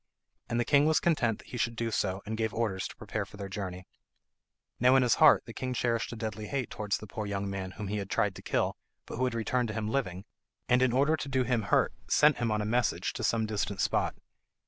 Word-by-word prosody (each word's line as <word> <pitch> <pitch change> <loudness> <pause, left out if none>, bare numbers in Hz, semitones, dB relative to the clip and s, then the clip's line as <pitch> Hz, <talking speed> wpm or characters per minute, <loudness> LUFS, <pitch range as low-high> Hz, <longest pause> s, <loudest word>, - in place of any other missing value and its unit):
And 120 - 0
the 120 - +1
king 145 +1 +4
was 155 -2 +4
content 120 -10 +1
that - - -16
he 125 - -5
should 115 0 0
do 115 0 -2
so, 95 -2 -1
and 110 +1 -3
gave 110 0 -2
orders 105 -5 -1
to - - -12
prepare - - -4
for - - -13
their 100 -1 -5
journey. 95 -2 -5 0.9
Now 125 +2 +5
in 135 - +5
his 120 - +4
heart 155 -2 +7
the 115 - -9
king 130 +1 -3
cherished 115 -2 0
a - - -5
deadly 110 -1 -5
hate 135 -4 -3
towards 105 -1 -1
the - - -9
poor 105 +1 -5
young 100 0 -2
man 95 -1 -4
whom 105 - -6
he 105 +2 -2
had 100 -1 -4
tried - - +1
to - - -10
kill, - - 0 0.3
but - - -7
who 130 - +1
had 125 -2 -1
returned 120 +2 0
to 105 - -5
him 110 -1 -2
living, 95 -9 -2 0.4
and 125 0 +4
in 130 -1 +4
order 140 +5 +3
to 140 -2 -5
do 130 -1 +2
him 120 -2 +1
hurt 100 - +2
sent 150 -1 +5
him 120 -1 0
on 105 0 0
a - - -3
message 120 +2 0
to - - -5
some 115 -1 +2
distant 105 -2 -2
spot. - - +1
115 Hz, 255 wpm, -30 LUFS, 105-125 Hz, 0.9 s, heart